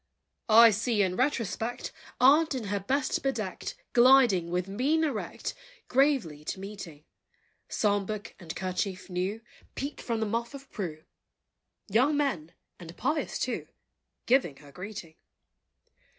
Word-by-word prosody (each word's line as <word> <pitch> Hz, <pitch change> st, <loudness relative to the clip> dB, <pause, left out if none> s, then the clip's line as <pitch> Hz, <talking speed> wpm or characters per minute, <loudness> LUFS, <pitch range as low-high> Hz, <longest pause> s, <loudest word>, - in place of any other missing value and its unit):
I 230 Hz, +1 st, +9 dB
see 215 Hz, 0 st, +1 dB
in 185 Hz, -1 st, 0 dB
retrospect 245 Hz, -2 st, -1 dB, 0.3 s
Aunt, 290 Hz, +4 st, +5 dB
in 250 Hz, -, -3 dB
her 200 Hz, -, 0 dB
best 260 Hz, +8 st, 0 dB
bedecked, 235 Hz, -, -3 dB, 0.2 s
Gliding, 240 Hz, -8 st, +6 dB
with 180 Hz, +1 st, -1 dB
mien 270 Hz, +11 st, +1 dB
erect, 275 Hz, -9 st, -3 dB, 0.4 s
Gravely 250 Hz, -, +2 dB
to 190 Hz, -, -4 dB
meeting: 190 Hz, -7 st, -9 dB, 0.6 s
Psalm 205 Hz, -2 st, +1 dB
book, 215 Hz, -1 st, -5 dB
and 170 Hz, -4 st, -7 dB
kerchief 185 Hz, +1 st, -3 dB
new, 185 Hz, +5 st, -2 dB, 0.3 s
Peeped 280 Hz, +2 st, -4 dB
from 230 Hz, -2 st, -2 dB
the 220 Hz, -, 0 dB
Muff 230 Hz, +5 st, -2 dB
of 275 Hz, 0 st, -12 dB
Pru., 160 Hz, -7 st, -5 dB, 0.8 s
Young 255 Hz, +8 st, +3 dB
men 200 Hz, -, -1 dB, 0.3 s
and 170 Hz, -1 st, -11 dB
pious, 300 Hz, +4 st, -1 dB
too -, -, -2 dB, 0.6 s
Giving 235 Hz, -, +2 dB
her 145 Hz, -1 st, -15 dB
greeting. 180 Hz, 0 st, -8 dB
215 Hz, 130 wpm, -29 LUFS, 185-260 Hz, 0.8 s, I